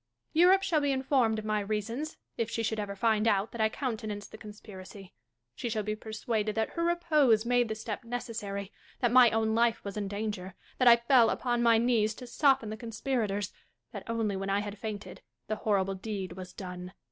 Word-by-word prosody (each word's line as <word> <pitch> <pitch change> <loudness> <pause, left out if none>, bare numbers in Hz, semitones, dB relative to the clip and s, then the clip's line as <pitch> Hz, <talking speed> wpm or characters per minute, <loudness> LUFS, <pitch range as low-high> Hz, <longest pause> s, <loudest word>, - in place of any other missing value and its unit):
Catharine. 320 - +4
Europe 380 +2 +6
shall 340 -6 +2
be 285 -1 +1
informed 260 -4 +2
of 215 - -5
my 215 0 +1
reasons, 220 +8 -3 0.2
if 230 -1 -2
she 230 0 -2
should 220 0 -1
ever 200 -1 -4
find 220 +1 +2
out 200 0 +2
that 235 - -4
I 220 - +4
countenanced 220 -5 -4
the - - -10
con 215 - -9
spiracy. 195 -2 -11 0.4
She 235 - -4
shall 215 -1 -1
be 215 +1 -2
persuaded 220 0 -3
that 220 0 0
her 335 - -2
repose 305 -10 +3
made 245 0 +2
the 220 - -2
step 220 +1 -5
necessary; 220 -4 -5 0.3
that 240 -2 +2
my 250 -1 +8
own 220 0 +1
life 230 0 +2
was 200 0 -6
in 205 -1 -2
danger; 200 -3 -4 0.2
that 255 - +4
I 235 - +10
fell 235 0 +4
upon 240 -2 0
my 230 -1 +5
knees 225 -2 +2
to 250 - -9
soften 260 -4 +2
the 215 - -5
conspirators; 220 -3 -2 0.4
that, - - -8
only 225 -3 0
when 195 +1 -3
I 200 +1 +1
had 205 0 -7
fainted, 215 -2 -6 0.2
the 215 +1 -3
horrible 195 -3 +1
deed 195 -1 -5
was 180 0 -8
done. 180 -1 -8
220 Hz, 205 wpm, -30 LUFS, 205-240 Hz, 0.4 s, I